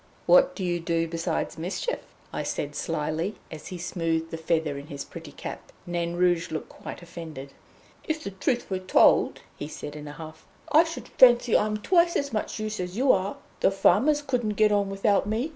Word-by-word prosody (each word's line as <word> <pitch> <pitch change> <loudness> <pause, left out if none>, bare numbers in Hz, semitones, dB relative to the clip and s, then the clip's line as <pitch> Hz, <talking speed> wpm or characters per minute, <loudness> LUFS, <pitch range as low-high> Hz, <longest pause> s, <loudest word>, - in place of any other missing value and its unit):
"What - - +5
do 195 - -4
you 175 -1 0
do 165 0 0
besides 165 0 -2
mischief?" 190 - -2 0.3
I - - -2
said 145 0 -3
slyly, 160 +5 -2 0.2
as 155 -2 -8
he 185 - -6
smoothed 165 -2 -2
the 165 - -4
feather 160 -2 0
in 140 +1 -8
his 140 -3 -6
pretty - - -10
cap. - - -8
Nain 175 0 -2
Rouge 175 -1 +2
looked 155 - -5
quite - - -9
offended. 160 -5 -9 0.5
"If 315 0 -2
the 200 - -4
truth 240 +6 -1
were 190 - 0
told," 185 0 +4 0.2
he 145 - -5
said 150 -1 -7
in 150 0 -8
a 145 - -7
huff, 160 +1 -11 0.2
"I 320 +3 +7
should 330 0 -7
fancy 240 -2 +6
I'm 215 0 +2
twice 340 - +3
as 280 -2 -1
much 215 0 -2
use 215 -1 -3
as 180 +2 -4
you 260 +1 +5
are. 195 +1 0 0.2
The - - +4
farmers 235 +10 +3
couldn't 245 -6 -1
get 215 -1 +5
on 200 -1 +2
without 195 +1 +1
me. 225 +8 -1
180 Hz, 195 wpm, -26 LUFS, 165-215 Hz, 0.5 s, I